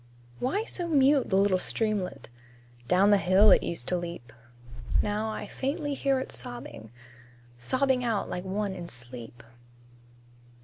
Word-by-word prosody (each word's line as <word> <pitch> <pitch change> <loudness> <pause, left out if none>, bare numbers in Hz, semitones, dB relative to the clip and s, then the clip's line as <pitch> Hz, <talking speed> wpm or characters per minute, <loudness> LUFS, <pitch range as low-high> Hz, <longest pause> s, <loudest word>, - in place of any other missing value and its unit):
Why 290 - 0
so 355 -6 -3
mute 280 -3 +3
the 190 - +1
little 195 -2 +3
streamlet? 200 - -1 0.6
Down 195 +3 +4
the 205 - +5
hill 190 +4 +5
it - - +6
used 165 -8 -2
to 180 - +1
leap; 170 -9 -7 0.7
Now 210 +1 -1
I 220 - -5
faintly 290 +2 -3
hear 275 -1 +1
it 260 - -5
sobbing 120 -2 -7 0.7
Sobbing 260 - +1
out 225 -4 0
like 180 - -4
one 195 +1 -2
in 175 -2 -7
sleep. 120 -1 -10
200 Hz, 140 wpm, -28 LUFS, 170-260 Hz, 0.7 s, it